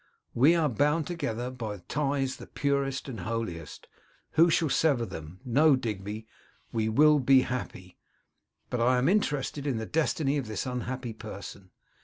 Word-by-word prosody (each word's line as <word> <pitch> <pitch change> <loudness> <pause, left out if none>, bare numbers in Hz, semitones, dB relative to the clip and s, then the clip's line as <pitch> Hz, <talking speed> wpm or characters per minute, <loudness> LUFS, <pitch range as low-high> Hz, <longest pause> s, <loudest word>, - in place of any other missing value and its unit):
We 145 +8 +5
are 165 -3 +2
bound 150 +6 +1
together 125 -8 -3
by 110 -5 -5
ties 140 -2 -1
the - - -11
purest, 140 -1 -1
the 120 -8 -6
holiest. 90 -7 -5 0.4
Who 165 +2 +5
shall 160 -1 +2
sever 135 -4 +2
them? 85 -2 -9
No! 140 +4 +5
Digby, 105 -3 -4 0.5
we 110 -1 0
will 150 +6 +5
be 135 0 +5
happy; 105 -8 -5 0.7
but 125 - -1
I 125 +2 +4
am 125 +3 +2
interested 150 -7 0
in 130 -5 0
the 110 - -3
destiny 150 0 0
of 130 - -5
this 110 +2 -3
unhappy 125 -1 -4
person. 100 -3 -9
130 Hz, 155 wpm, -28 LUFS, 110-145 Hz, 0.7 s, We